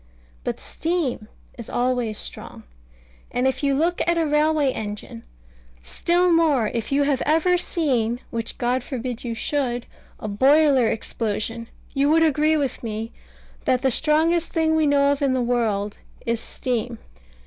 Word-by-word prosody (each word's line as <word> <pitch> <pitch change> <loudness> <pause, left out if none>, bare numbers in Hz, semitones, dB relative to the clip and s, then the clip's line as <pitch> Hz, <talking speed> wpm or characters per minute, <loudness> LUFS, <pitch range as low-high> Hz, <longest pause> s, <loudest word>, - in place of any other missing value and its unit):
But - - -3
steam 320 -10 -2 0.3
is 235 - -8
always 245 -3 0
strong. - - -8 0.7
And 250 +2 0
if 265 - -1
you 280 -1 +2
look 335 +5 +1
at 345 0 +2
a 330 - +2
railway 300 -1 +2
engine, 205 - -6 0.6
still 345 - +1
more 300 -10 +3
if 230 +1 -3
you 285 +1 +3
had 280 -2 +1
ever 325 +4 +3
seen 255 -10 0
which 230 -1 -4
God 250 +1 0
forbid 250 -2 -5
you 235 -2 -3
should 245 -2 -1 0.3
a 215 - -5
boiler 270 +3 +4
explosion, 225 +1 -3 0.3
you 280 +1 +2
would 325 +1 +5
agree 310 0 +3
with 275 -4 -2
me, 225 0 -4 0.5
that 255 0 +2
the 265 - +3
strongest 320 +5 +2
thing 320 -1 +2
we 315 -1 +3
know 280 0 +4
of 285 - -1
in 275 -2 +2
the - - +1
world 225 -4 0 0.3
is 230 -1 0
steam. 240 -1 -3
265 Hz, 155 wpm, -23 LUFS, 230-310 Hz, 0.7 s, would